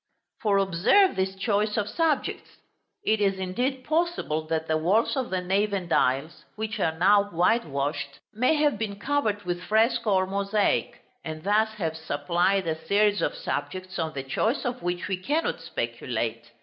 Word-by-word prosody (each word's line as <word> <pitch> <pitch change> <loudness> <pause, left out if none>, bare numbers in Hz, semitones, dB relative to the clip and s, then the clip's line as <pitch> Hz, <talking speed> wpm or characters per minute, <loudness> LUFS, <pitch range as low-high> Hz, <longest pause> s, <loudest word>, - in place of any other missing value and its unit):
For 205 -2 +2
observe 195 - +4
this 190 0 -1
choice 210 +1 0
of 210 -1 0
subjects. 320 +3 -1 0.6
It 220 0 +2
is 195 -1 +2
indeed 245 +8 -2
possible 310 - -1
that 160 0 -1
the 160 - +1
walls 200 - +2
of 260 -3 -2
the 185 -1 -1
nave 200 +3 0
and 180 -4 -2
aisles, 140 +5 +1
which 220 0 -4
are 160 -4 0
now 200 +4 +5
whitewashed, 155 -7 0 0.2
may 250 +8 +2
have 295 -1 +2
been 205 -3 -3
covered 220 -6 0
with 175 -1 -3
fresco 220 +1 +2
or 185 0 +3
mosaic, 200 +2 0 0.2
and 155 -1 -6
thus 215 +2 +2
have 165 -6 -2
supplied 170 +5 0
a 160 -1 -3
series 205 0 +3
of - - 0
subjects, 185 - -4
on 160 -1 -2
the 135 -2 -4
choice 220 - -1
of 245 0 -3
which 175 0 -2
we 190 - -1
cannot 290 - -1
speculate. - - -3
200 Hz, 165 wpm, -26 LUFS, 175-220 Hz, 0.6 s, now